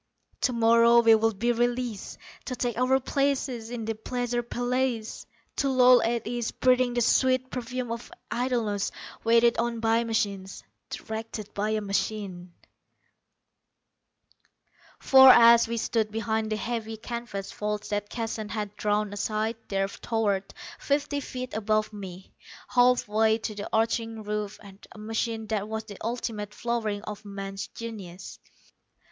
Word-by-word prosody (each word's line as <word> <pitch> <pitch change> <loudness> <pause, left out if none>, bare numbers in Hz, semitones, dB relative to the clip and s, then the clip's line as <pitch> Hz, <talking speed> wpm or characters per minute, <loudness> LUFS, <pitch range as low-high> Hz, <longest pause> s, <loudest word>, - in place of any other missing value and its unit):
Tomorrow, 235 -1 +5
we 225 -1 +6
would 220 -1 +2
be 240 +4 +1
released, 240 -2 -2 0.3
to 255 - -3
take 245 -2 -2
our 255 +2 +3
places 265 -4 -1
in 235 -2 -5
the 225 - -1
pleasure 245 +2 -2
palaces. 245 -1 -2 0.3
To 275 - +1
loll 255 -1 +6
at 235 0 -1
ease, 240 -1 -2
breathing 255 -1 +2
the 240 - +2
sweet 255 +2 +2
perfume 250 -1 -4
of 230 0 -6 0.2
idleness, 235 -5 0 0.3
waited 230 +1 +4
on 235 0 -1
by 225 +1 +2
machines 200 -4 -2 0.3
directed 220 -1 -6
by 210 +1 -1
a 215 0 0
machine. 195 -3 -3 2.5
For, 265 -1 +8
as 235 -1 +8
we 235 0 -2
stood 220 -1 0
behind 220 0 -1
the 215 - 0
heavy 225 -1 -4
canvas 220 -4 -6
folds 210 0 -3
that 205 0 -2
Keston 225 -2 -4
had 210 -2 -4
drawn 210 0 0
aside, 215 +2 -1
there 195 -1 0
towered, 200 -2 -1 0.3
fifty 285 0 0
feet 255 -2 -6
above 215 0 0
me, 190 -2 -9 0.4
halfway 225 -3 +3
to 220 -1 -5
the 205 -1 -6
arching 225 0 0
roof, 210 0 -3 0.4
a - - -14
machine 225 +1 -3
that 210 -2 -1
was 220 0 -3
the 205 -3 -11
ultimate 220 -3 -4
flowering 220 -3 -2
of 210 -1 -7
man's 195 0 -6
genius. 205 -7 -8
225 Hz, 135 wpm, -27 LUFS, 210-240 Hz, 2.5 s, For